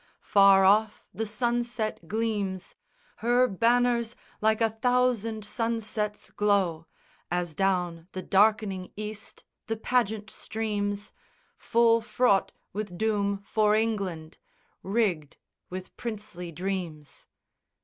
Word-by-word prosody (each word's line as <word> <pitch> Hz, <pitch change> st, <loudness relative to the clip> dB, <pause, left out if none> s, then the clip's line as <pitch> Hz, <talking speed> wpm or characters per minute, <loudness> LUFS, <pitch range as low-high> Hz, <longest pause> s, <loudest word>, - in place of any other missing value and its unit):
Far 195 Hz, -1 st, +6 dB
off 210 Hz, +2 st, +3 dB
the 225 Hz, 0 st, -3 dB
sunset 235 Hz, -4 st, -2 dB
gleams: 205 Hz, -3 st, -2 dB, 0.4 s
Her 245 Hz, +2 st, +3 dB
banners 235 Hz, +2 st, +2 dB, 0.3 s
like 220 Hz, 0 st, +3 dB
a 225 Hz, -1 st, +2 dB
thousand 230 Hz, -2 st, +1 dB
sunsets 215 Hz, -1 st, -2 dB
glow, 190 Hz, -6 st, +1 dB, 0.4 s
As 175 Hz, -2 st, -2 dB
down 175 Hz, -2 st, 0 dB
the 185 Hz, -, -5 dB
darkening 200 Hz, -2 st, +2 dB
East 215 Hz, 0 st, -7 dB, 0.2 s
the 225 Hz, -, -2 dB
pageant 220 Hz, -3 st, 0 dB
streams, 205 Hz, -2 st, -3 dB, 0.4 s
Full 230 Hz, 0 st, +3 dB
fraught 235 Hz, -3 st, +2 dB, 0.2 s
with 205 Hz, -4 st, -5 dB
doom 200 Hz, -1 st, 0 dB
for 215 Hz, 0 st, +3 dB
England, 195 Hz, -8 st, -2 dB, 0.4 s
rigged 190 Hz, -8 st, -1 dB, 0.3 s
with 185 Hz, 0 st, -7 dB
princely 205 Hz, -6 st, -6 dB
dreams. 170 Hz, -4 st, -5 dB
210 Hz, 100 wpm, -27 LUFS, 190-225 Hz, 0.4 s, Far